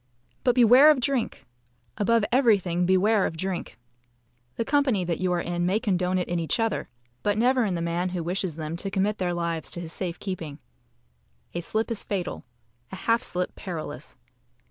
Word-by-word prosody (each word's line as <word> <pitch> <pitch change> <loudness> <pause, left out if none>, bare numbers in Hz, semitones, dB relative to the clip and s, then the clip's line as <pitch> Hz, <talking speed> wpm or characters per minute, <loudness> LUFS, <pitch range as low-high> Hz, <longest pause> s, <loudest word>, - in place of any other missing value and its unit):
But 245 -2 +3
beware 250 +4 +8
of 300 -3 +5
drink! 255 -1 -1 0.5
Above 230 +1 +2
everything, 195 -9 +3
beware 195 +2 +3
of 165 - -7
drink! 185 +1 -4 0.8
The 230 - -2
company 270 -9 +2
that 170 -1 -2
you 185 -1 0
are 175 - +1
in 175 0 -2
may 195 +4 +2
condone 185 -5 0
it 180 - -1
in 175 0 -1
each 165 +7 0
other, 225 -1 -1 0.3
but 205 0 0
never 250 +2 +3
in 190 -4 -1
the 170 - -2
man 170 +2 -1
who 180 -2 -3
wishes 180 -1 -2
them 155 0 -4
to 195 - -3
commit 200 +2 0
their 175 -2 0
lives 170 -2 -2
to - - -3
his 165 -2 -5
safe 175 -3 -3
keeping. 165 -7 -5 1.0
A 175 - -2
slip 220 +7 -2
is 225 - -1
fatal 190 -4 -4 0.5
a - - -5
half 230 +5 +1
slip 180 -5 -2
perilous. 170 -5 -7
185 Hz, 185 wpm, -26 LUFS, 175-225 Hz, 1.0 s, beware